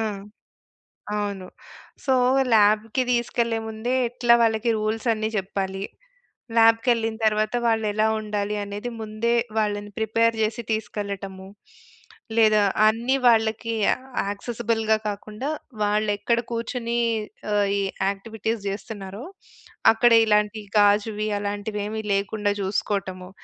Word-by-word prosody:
ఆ! - - +1 1.2
అవును. 200 -3 -3 0.6
సో, 265 - +3 0.4
ల్యాబ్‌కి 215 +4 +3
దీసుకెళ్ళే 235 -1 0
ముందే 220 +3 -2
ఎట్లా 240 0 +3
వాళ్ళకి 225 +1 +1
రూల్స్ 215 +2 -2
అన్నీ 215 0 -2
జెప్పాలి. 195 0 -3 0.8
ల్యాబ్‌కెళ్ళిన 225 0 +3
తర్వాత, 215 +1 0
వాళ్ళెలా 220 -1 +1
ఉండాలి 210 -1 -2
అనేది 205 +4 -5
ముందే 220 +2 -1 0.2
వాళ్ళని 205 -1 -2
ప్రిపేర్ 230 +1 +2
జేసి 220 +2 -2
తీసుకెళ్లటము. 200 -3 -5 0.9
లేదా 215 -2 +5 0.3
అన్ని 235 +4 +1
వాళ్ళకి 225 0 +2 0.5
యాక్సెసిబుల్‌గా 220 +1 -1
కాకుండా, 210 +6 -5 0.3
వాళ్ళెక్కడ 210 +2 +1
కూర్చొని 235 0 -2 0.6
ఆహ్, 205 -1 +2
ఈ - - 0 0.3
యాక్టివిటీస్ 220 +2 -4
జేస్తున్నారో 200 +1 -6 0.7
అక్కడ 240 +2 +4
ఇలాంటి 210 0 +1 0.2
గాజువి 210 +1 +2
అలాంటివేమి 205 +1 -3
లేకుండా 205 +1 0
జూసుకోవటము, 190 -2 -2
215 Hz, 95 wpm, -24 LUFS, 205-225 Hz, 1.2 s, లేదా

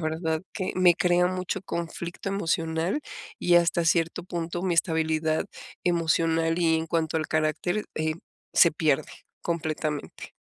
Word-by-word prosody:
verdad 160 0 -1
que 185 -3 -2
me 180 -2 +6
crea 180 +1 +3
mucho 185 +1 -3
conflicto 170 +1 -5
emocional, 165 - 0 0.4
y 175 -1 +4
hasta 170 0 +3
cierto 165 +1 +1
punto 175 0 -4
mi 185 - +1
estabilidad 160 -1 +1 0.4
emocional 165 -1 +2
y 160 -1 +4
en 160 - -2
cuanto 160 -1 0
al 155 -1 -1
carácter, 155 +6 0
eh, 155 0 0 0.4
se 170 - +6
pierde 155 -3 +1 0.3
completamente. 155 -3 -3
165 Hz, 130 wpm, -26 LUFS, 160-175 Hz, 0.4 s, me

